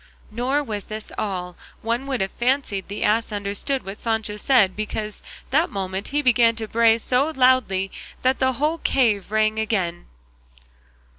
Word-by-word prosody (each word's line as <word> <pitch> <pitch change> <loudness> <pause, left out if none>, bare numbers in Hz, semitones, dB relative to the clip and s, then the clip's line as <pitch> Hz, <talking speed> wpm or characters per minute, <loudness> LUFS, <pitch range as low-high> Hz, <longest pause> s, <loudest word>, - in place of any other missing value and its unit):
Nor 255 +6 0
was 210 -6 -5
this 215 0 -7
all; 180 -3 -3 0.3
one 235 +4 -1
would 260 -5 -1
have 190 - -1
fancied 240 -6 -1
the 205 - -4
ass 225 +2 +2
understood 205 +7 -2
what 195 +2 -7
Sancho 220 -2 -1
said, 210 -4 +3
because 215 0 -4 0.3
that 315 +6 +3
moment 190 0 -4
he 295 +1 -1
began 235 -3 +4
to 225 -1 -4
bray 225 0 +4
so 255 +6 +1
loudly 250 -7 +3 0.3
that 260 +1 +2
the 260 0 +2
whole 305 +6 0
cave 220 -11 +1
rang 215 0 +2
again. 185 -6 -1
220 Hz, 155 wpm, -23 LUFS, 205-255 Hz, 0.3 s, began